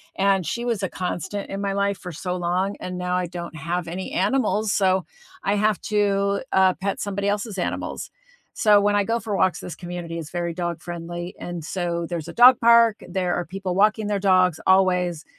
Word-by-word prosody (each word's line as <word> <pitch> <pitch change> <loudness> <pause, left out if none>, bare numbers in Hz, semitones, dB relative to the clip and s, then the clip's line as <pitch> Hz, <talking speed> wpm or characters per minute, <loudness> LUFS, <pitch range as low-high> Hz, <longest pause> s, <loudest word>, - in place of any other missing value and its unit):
and 195 -2 +2
she 235 +9 -3
was 230 -4 -1
a 190 - 0
constant 190 +2 -4
in 195 - -4
my 200 -1 -1
life 200 0 0
for 180 -3 -8
so 180 +3 -3
long, 180 +3 -1
and 180 0 -5
now 180 0 -1
I 180 -1 -1
don't 170 -1 -7
have 170 +2 -3
any 185 +2 -5
animals, 215 0 +1
so 190 -3 +2 0.4
I 200 - +1
have 210 -1 +1
to, 200 -1 +1
uh, 190 -1 +5
pet 195 +3 -3
somebody 200 0 -2
else's 205 0 -2
animals. 180 - -3 0.4
So, 210 -3 +5
when 205 0 +2
I 205 - +3
go 230 +3 0
for 215 -3 -3
walks, 185 -2 +2
this 175 - -7
community 175 -2 -6
is 160 -2 -7
very 175 -1 -2
dog 175 -2 -3
friendly, 175 0 -6
and 175 -3 -6
so 170 -1 -2
there's 170 -2 -4
a - - -7
dog 250 +1 +7
park, 230 -1 +5
there 180 -2 -1
are 175 - -2
people 190 +1 -4
walking 210 +2 +3
their 205 -1 0
dogs 185 -4 +3
always, 180 -3 +3
190 Hz, 205 wpm, -23 LUFS, 175-205 Hz, 0.4 s, dog